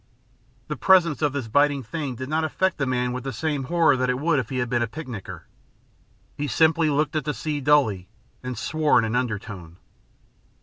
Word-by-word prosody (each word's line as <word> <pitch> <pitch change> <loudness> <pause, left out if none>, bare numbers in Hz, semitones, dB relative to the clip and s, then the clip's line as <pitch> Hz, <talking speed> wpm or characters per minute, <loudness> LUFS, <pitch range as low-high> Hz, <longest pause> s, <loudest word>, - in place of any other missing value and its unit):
The - - -3
presence 175 -6 +4
of 150 -2 +2
this 140 -4 -4
biding 145 +3 +2
thing 135 +2 -4
did 130 +2 -6
not 155 +2 0
affect 185 +3 0
the 135 - 0
man 125 -1 0
with 125 0 -5
the 135 - -4
same 145 +2 -2
horror 165 -1 +3
that 130 0 0
it 125 - +1
would 155 +1 +1
if 125 - -4
he 130 - -3
had 125 -1 0
been 120 0 0
a 120 - 0
picnicker. 125 -5 -8 0.9
He 145 - -3
simply 160 +3 +3
looked 150 +1 0
at 155 - 0
the 150 +1 -3
sea 150 -2 -3
dully 120 -11 +2 0.3
and 125 -1 -5
swore 155 -1 +1
in - - +3
an 110 +1 -2
undertone. 105 -8 -4
135 Hz, 205 wpm, -24 LUFS, 125-155 Hz, 0.9 s, presence